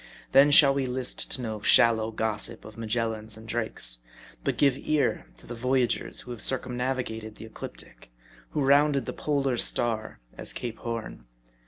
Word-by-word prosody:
Then 140 +2 +6
shall 140 -1 +7
we 135 -1 -1
list 125 0 0
to 130 - -1
no 110 -2 -5
shallow 110 0 +4
gossip 110 +1 -2
of 110 - -11
Magellans 110 -1 -2
and 110 +1 -12
Drakes; 110 - 0 0.4
but - - -1
give 140 -3 +3
ear 145 - -1
to - - -13
the 120 - -7
voyagers 125 +1 -1
who 125 - -10
have 120 - -7
circum 130 -1 0
navigated 120 -4 -4
the - - -11
Ecliptic; 110 - -11 0.4
who 150 - -2
rounded 140 -1 +3
the - - -5
Polar 140 -4 -1
Star 115 -2 +1 0.2
as - - -4
Cape 120 -2 -6
Horn. 115 - -6
120 Hz, 165 wpm, -26 LUFS, 110-130 Hz, 0.4 s, shall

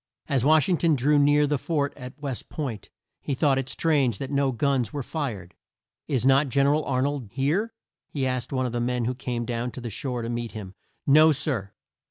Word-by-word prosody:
As 135 -4 +1
Wash 155 0 +5
ing 180 - +2
ton 165 -2 +3
drew 145 +3 +3
near 145 +1 +4
the 145 -1 0
fort 145 -3 -1
at 130 +2 -10
West 140 -4 -5
Point, 130 -9 -5 0.3
he 140 - -3
thought 135 -1 +2
it 135 0 -4
strange 140 -9 +1
that 135 +4 -5
no 140 -1 +2
guns 125 -2 0
were 145 -2 -4
fired. 115 - -4 0.5
"Is 130 -3 0
not 135 +1 +4
Gen 140 +2 +2
er 140 - +4
al 155 0 0
Ar 130 -1 0
nold 140 -6 -2
here?" 155 - 0 0.4
he 140 -3 -2
asked 130 -2 -2
of 130 -2 -1
the 120 - -2
man 125 0 0
who 125 - 0
came 120 -2 -4
down 120 +1 -2
to - - -7
the 120 -2 -5
shore 125 +1 -3
to - - -3
meet 120 -1 -4
him. 100 -4 -7 0.3
"No, 155 +3 +7
sir. 130 -9 -2
135 Hz, 220 wpm, -25 LUFS, 120-145 Hz, 0.5 s, No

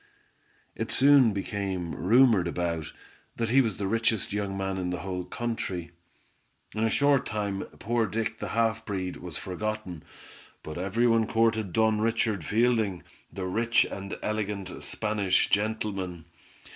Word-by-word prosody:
It - - -4
soon 135 -3 +6
became 95 -3 -3
rumored 110 -3 +4
about, 85 -3 -2 0.4
that 115 -1 -1
he 135 +4 +6
was 110 -6 -1
the 100 - -2
richest 115 0 0
young 100 -1 -2
man 95 0 -2
in 90 -1 -2
the 90 - -3
whole 90 -2 -3
country. 95 -8 -4 0.8
In 110 - -1
a 115 - +3
short 140 +3 +3
time, 100 -2 -2
poor 115 0 0
Dick, 110 +2 -3
the - - -4
half 115 -1 +1
breed, 95 -4 -3
was 90 -4 -5
forgotten, 95 -3 -4 0.6
but 80 +2 -6
every 100 +6 +1
one 115 -2 +3
courted 115 -4 +1
Don 110 +2 +2
Richard 115 -4 +1
Fielding, 110 -1 +1 0.3
the 95 -2 -5
rich 115 +5 +2
and 100 0 -6
elegant 105 -3 -3
Spanish 105 -3 +1
gentleman. 100 -5 -1
105 Hz, 145 wpm, -28 LUFS, 95-115 Hz, 0.8 s, soon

